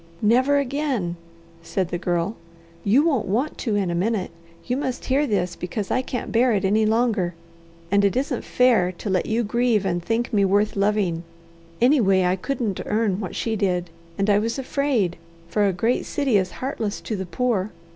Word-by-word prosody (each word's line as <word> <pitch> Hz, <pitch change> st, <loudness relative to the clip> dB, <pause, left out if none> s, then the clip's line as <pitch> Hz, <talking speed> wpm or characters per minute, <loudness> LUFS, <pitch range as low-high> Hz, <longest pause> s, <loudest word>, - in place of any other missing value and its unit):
"Never 255 Hz, +6 st, +4 dB
again," 270 Hz, -, -1 dB, 0.5 s
said 180 Hz, +1 st, -2 dB
the 175 Hz, -, -3 dB
Girl. 175 Hz, +4 st, -1 dB, 0.5 s
"You 235 Hz, +9 st, +4 dB
won't 285 Hz, -9 st, +1 dB
want 245 Hz, +10 st, -1 dB
to 220 Hz, -5 st, -1 dB
in 195 Hz, -4 st, 0 dB
a -, -, -1 dB
minute. 195 Hz, +2 st, -1 dB, 0.3 s
You 250 Hz, -, -1 dB
must 265 Hz, -2 st, -3 dB
hear 280 Hz, +3 st, +2 dB
this, 180 Hz, -5 st, 0 dB
because 190 Hz, +3 st, -4 dB
I 255 Hz, -, +2 dB
can't 255 Hz, -1 st, -5 dB
bear 240 Hz, +1 st, +3 dB
it 195 Hz, -2 st, 0 dB
any 215 Hz, +3 st, +3 dB
longer, 220 Hz, -6 st, +1 dB, 0.6 s
and 200 Hz, 0 st, +4 dB
it 200 Hz, +1 st, +2 dB
isn't 260 Hz, -1 st, -1 dB
fair 230 Hz, -8 st, +3 dB
to 200 Hz, -, -6 dB
let 185 Hz, -2 st, +1 dB
you 230 Hz, +2 st, +1 dB
grieve 230 Hz, -1 st, +1 dB
and 175 Hz, -2 st, 0 dB
think 230 Hz, +4 st, -1 dB
me 200 Hz, -2 st, +4 dB
worth 205 Hz, +2 st, +2 dB
loving. 200 Hz, -4 st, +1 dB, 0.6 s
Anyway, 220 Hz, -8 st, +4 dB
I 180 Hz, +1 st, +2 dB
couldn't 215 Hz, 0 st, -2 dB
earn 210 Hz, -3 st, +1 dB
what 190 Hz, -4 st, -5 dB
she 225 Hz, -1 st, -1 dB
did, 180 Hz, -4 st, -1 dB, 0.3 s
and 200 Hz, -, 0 dB
I 205 Hz, -1 st, +4 dB
was 230 Hz, +4 st, -2 dB
afraid, 265 Hz, -9 st, 0 dB, 0.3 s
for 205 Hz, +4 st, +2 dB
a -, -, +2 dB
great 225 Hz, +7 st, 0 dB
city 275 Hz, -6 st, 0 dB
is 190 Hz, -2 st, +2 dB
heartless 230 Hz, -6 st, -3 dB
to 220 Hz, -, -3 dB
the 190 Hz, -2 st, -4 dB
poor. 220 Hz, -2 st, 0 dB
215 Hz, 185 wpm, -23 LUFS, 190-245 Hz, 0.6 s, Never